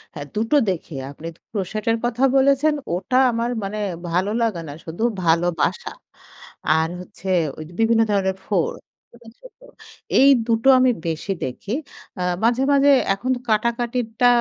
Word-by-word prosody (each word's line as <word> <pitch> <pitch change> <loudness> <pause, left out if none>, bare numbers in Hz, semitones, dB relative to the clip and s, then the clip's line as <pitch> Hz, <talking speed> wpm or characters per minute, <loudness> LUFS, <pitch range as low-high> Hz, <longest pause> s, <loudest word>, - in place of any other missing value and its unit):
হ্যাঁ। 145 -1 -7
দুটো 225 +7 +1
দেখে 170 -4 -4 0.2
আপনি 155 +3 -9 0.2
crochet 215 0 -4 0.2
কথা 240 +2 -1
বলেছেন। 275 +3 +4 0.2
ওটা 190 +8 -1
আমার 235 +1 -1
মানে 200 +2 -4 0.3
ভালো 185 +4 0
লাগে 215 -7 0
না 145 - -7
শুধু, 170 +7 -5 0.2
ভালোবাসা। 170 0 +1 0.9
আর 160 0 +1
হচ্ছে 190 +1 -11 0.3
ঐ - - -10 0.2
বিভিন্ন 225 0 +3
ধরনের 190 -1 0
ফুল। 185 -6 0 0.4
এটাই 235 -1 -15
সত্য, - - -16 0.6
এই 275 - +7 0.2
দুটো 230 +2 +1
আমি 255 0 +4 0.2
বেশি 165 +4 -3
দেখি। 130 +10 -7 0.5
আ - - -1 0.2
মাঝে 240 +3 +2
মাঝে 280 0 +4 0.2
এখন 220 +6 -5
তো - - -7
কাটাকাটিরটা 235 +1 0
220 Hz, 140 wpm, -21 LUFS, 180-245 Hz, 0.9 s, এই